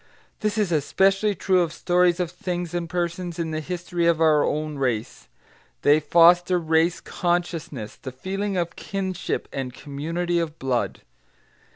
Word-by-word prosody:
This 210 -1 -1
is 205 -5 +1
especially 195 +7 +2
true 185 0 +2
of 170 -2 0
stories 175 +1 +2
of 175 -2 -1
things 175 -1 -4
and 170 -1 -2
persons 175 0 -3
in 165 -2 -2
the 155 - -2
history 175 +1 -2
of 170 -1 +3
our 155 -2 +4
own 150 -1 -2
race. 120 -5 -2 0.6
They 145 +2 +6
foster 175 +3 +5
race 165 +1 +2
consciousness, 170 - -3
the 130 - -7
feeling 195 +8 -3
of 170 -1 -2
kinship 190 -3 -3
and 130 -2 -3
community 165 +6 -2
of 165 -2 -3
blood. 130 -2 -1
170 Hz, 150 wpm, -24 LUFS, 155-180 Hz, 0.6 s, They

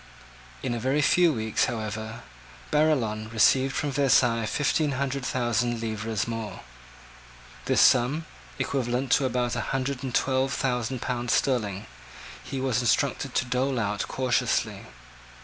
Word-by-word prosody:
In - - -1
a 120 - -2
very 130 +5 +1
few 175 +2 +4
weeks, 110 -5 0
however, 110 -1 -5 0.5
Barillon 120 -9 +1
received 130 +4 +3
from 145 -2 -1
Versailles 125 -4 +3
fifteen 145 +3 +1
hundred 135 0 -2
thousand 120 -1 0
livres 110 -1 -3
more. 115 -2 -5 1.0
This - - +3
sum, 130 +6 +4 0.3
equivalent 125 -1 -1
to 140 - +4
about 125 -1 0
a - - -1
hundred 135 0 -2
and 130 -3 -4
twelve 130 0 +1
thousand 125 -1 -2
pounds 120 -1 -1
sterling, 105 -6 0 0.6
he 135 +1 -5
was 130 -2 0
instructed 120 -3 0
to - - +2
dole 125 +1 0
out 105 -2 -2
cautiously. 130 -2 -1
125 Hz, 130 wpm, -26 LUFS, 115-135 Hz, 1.0 s, few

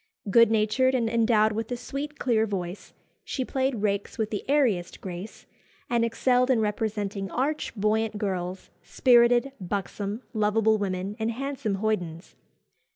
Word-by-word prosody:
Good 230 +1 +7
natured, 225 +4 +2
and 235 -3 +1
endowed 225 -2 +3
with 225 +2 -4
a 245 - -1
sweet 280 +5 -6
clear 225 -3 +1
voice, 185 -2 -5 0.3
she 260 - -3
played 260 -5 -1
rakes 200 -1 -1
with 220 -1 -1
the 210 - -3
airiest 240 -12 +1
grace, 185 +2 -8 0.5
and 235 -1 +3
excelled 250 +2 +2
in 255 -3 +4
representing 210 -2 -2
arch, 285 +3 -2
buoyant 215 +1 0
girls, 185 -2 -3
spirited, 245 +1 +4
buxom, 200 +4 -4
lovable 215 0 +2
women, 195 0 -3
and 220 +1 0
handsome 260 -3 -3
hoydens. 190 -5 -3
220 Hz, 140 wpm, -26 LUFS, 200-245 Hz, 0.5 s, Good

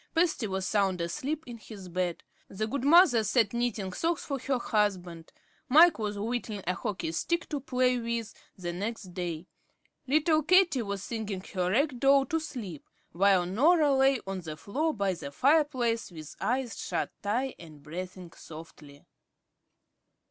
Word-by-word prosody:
Patsy 325 -9 +2
was 190 -1 -2
sound 195 -3 +1
asleep 270 - -3
in 240 -2 -9
his 205 -4 -10
bed. 180 -1 -2 0.3
The 215 +3 -3
good 255 +4 -3
mother 290 -6 +6
sat 215 0 +2
knitting 230 -6 -2
socks 330 - -1
for 275 -2 -3
her 265 +1 -1
husband; 185 -8 -1 0.4
Mike 320 +2 +7
was 210 -1 -2
whittling 215 -2 -3
a 180 - +1
hockey 185 -4 -3
stick 340 - -1
to 295 - -2
play 250 -1 +1
with 230 -1 -3 0.2
the 175 -2 -4
next 200 0 -5
day. 175 -2 -4 0.6
Little 310 +3 +3
Katie 335 -4 +4
was 200 -3 -4
singing 215 -4 -4
her 180 -2 0
rag 260 +5 +1
doll 275 0 +5
to 325 +5 -1
sleep, 225 - -7 0.2
while 190 0 +3
Norah 290 - +4
lay 270 -1 +4
on 195 -1 -4
the 155 -2 -7
floor 290 - -1
by 200 -7 -1
the 160 -5 -7
fireplace 260 - +2
with 155 -3 -10
eyes 250 -1 -1
shut - - -2
tight 245 +6 -1
and 155 -4 -13
breathing 180 +2 -7
softly. 155 -3 -13
220 Hz, 155 wpm, -29 LUFS, 185-270 Hz, 0.6 s, Mike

